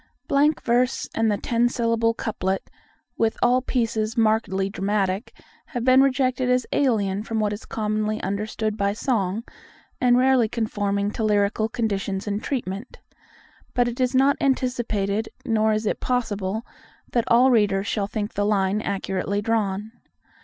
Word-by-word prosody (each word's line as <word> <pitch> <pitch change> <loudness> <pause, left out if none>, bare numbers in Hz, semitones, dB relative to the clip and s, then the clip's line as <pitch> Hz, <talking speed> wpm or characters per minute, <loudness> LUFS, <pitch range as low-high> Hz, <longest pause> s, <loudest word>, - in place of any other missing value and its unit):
Blank 295 +2 +2
verse 245 +1 +1
and 225 -1 +2
the 205 - 0
ten 240 +2 +1
syllable 230 -1 +1
couplet, 190 -4 -3 0.5
with 225 -1 +1
all 250 +1 +4
pieces 230 -3 -1
markedly 215 -4 +2
dramatic, 195 +1 -1 0.4
have 245 -7 -4
been 255 +1 +6
rejected 255 -1 +1
as 250 -1 +2
alien 205 -8 +1
from 225 +1 -3
what 210 -1 0
is 205 - -8
commonly 215 0 -1
understood 215 +1 -2
by 200 -1 0
song, 215 -3 -1 0.6
and 245 -1 +5
rarely 255 -3 +4
conforming 205 -3 -1
to 220 - -3
lyrical 210 +1 +1
conditions 200 -4 -2
in 205 -1 -2
treatment. 230 -3 -4 0.8
But 245 -1 +3
it 240 +2 -4
is 255 0 +1
not 270 +2 +4
anticipated, 230 -6 0 0.2
nor 220 -1 +2
is 215 +1 -1
it - - -1
possible, 220 -4 -2 0.5
that 235 -2 +1
all 250 +3 +5
readers 205 -4 +2
shall 205 -2 -1
think 210 0 -4
the 205 - 0
line 205 0 +1
accurately 195 0 -2
drawn. 210 -1 -1
220 Hz, 145 wpm, -24 LUFS, 205-245 Hz, 0.8 s, been